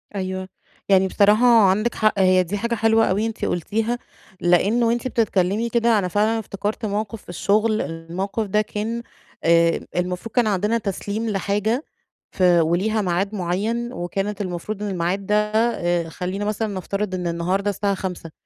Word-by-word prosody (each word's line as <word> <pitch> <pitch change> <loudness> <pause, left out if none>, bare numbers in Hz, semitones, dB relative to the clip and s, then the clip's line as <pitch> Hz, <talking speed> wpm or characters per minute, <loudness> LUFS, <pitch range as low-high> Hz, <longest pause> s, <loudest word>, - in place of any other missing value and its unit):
أيوه. 185 -1 -4 0.4
يعني 190 -1 +5
بصراحة 210 +5 +4 0.2
عندِك 215 +5 +1
حق. 215 -2 +2
هي 185 -1 +5
دي 195 +4 -3
حاجة 235 +3 -1
حلوة 225 0 +3
أوي 205 +4 +1
أنتِ 225 -1 -3
قلتيها، 225 +7 -1 0.4
لأنّ 195 +7 +3
وأنتِ 235 +2 +1
بتتكلّمي 215 -2 +1
كده، 235 -2 +3
أنا 185 - -1
فعلًا 215 +5 +1
افتكرت 210 +2 -4
موقف 210 +1 -3
في - - -19
الشغل. 215 +5 +1
الموقف 175 +6 -4
ده 210 +2 +2
كان 220 +2 -4 0.4
آآ، 170 0 +4 0.2
المفروض 180 +5 -3
كان 240 -3 +3
عندنا 210 +3 +1
تسليم 210 +1 -3
لحاجة 210 +6 -1 0.5
ف - - -7
وليها 175 +5 +3
ميعاد 195 +2 -1
مُعيّن، 215 +7 -2
وكانت 195 +3 -3
المفروض 195 +3 -4
إن 205 - -2
الميعاد 185 +2 -1
ده 210 - +1 0.2
آآ 175 -7 +1
خلّينا 185 +4 -4
مثلًا 215 +1 -1
نفترض 195 +1 -3
إن 180 -1 -3
النهارده 180 +4 -1
الساعة 200 0 0
17:00، 180 -4 -6
200 Hz, 155 wpm, -22 LUFS, 185-220 Hz, 0.5 s, يعني